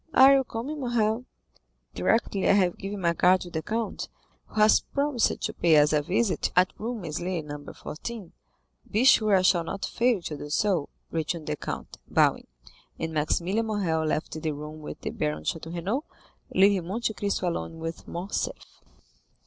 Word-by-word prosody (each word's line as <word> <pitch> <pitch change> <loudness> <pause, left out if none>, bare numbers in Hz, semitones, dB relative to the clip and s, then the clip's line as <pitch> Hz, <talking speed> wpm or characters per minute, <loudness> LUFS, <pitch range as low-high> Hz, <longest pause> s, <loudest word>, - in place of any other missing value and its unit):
Are 270 +1 +9
you 270 -1 +4
coming, 260 +6 -5
Morrel?" 240 -2 0 0.7
"Directly 195 - +1
I - - +7
have 185 -3 +2
given 200 0 -5
my 170 -1 +2
card 180 +2 +4
to 175 - -8
the 160 - -2
count, 225 +5 -3 0.4
who - - -19
has 215 0 +6
promised 280 -4 0
to - - -1
pay 165 -3 +4
us 150 +1 +5
a 150 - +3
visit 190 +6 0
at 180 +1 +4
Rue 235 +3 -3
Meslay, 175 -2 -3
No. 145 -1 -7
14." 200 +4 -7 0.6
"Be 220 +3 +1
sure 215 -6 +6
I 185 - +3
shall 175 -2 +4
not 195 +4 -4
fail 240 -3 +1
to 155 - -4
do 145 - -7
so," 175 -2 +1 0.2
returned 165 0 -2
the 150 - -2
count, - - -6
bowing. - - +2 0.5
And 160 - -3
Maximilian 175 +8 0
Morrel 180 -7 0
left 155 +1 -1
the 155 - -1
room 150 +2 -8
with 150 - -8
the - - -3
Baron 75 +1 -2
de - - 0
Château 165 0 -5
Renaud, 200 - -1 0.5
leaving 190 -2 +4
Monte 220 +3 -1
Cristo 200 -1 -1
alone 165 -1 -4
with 165 +1 -6
Morcerf. 180 +4 -4
185 Hz, 175 wpm, -27 LUFS, 160-220 Hz, 0.7 s, Are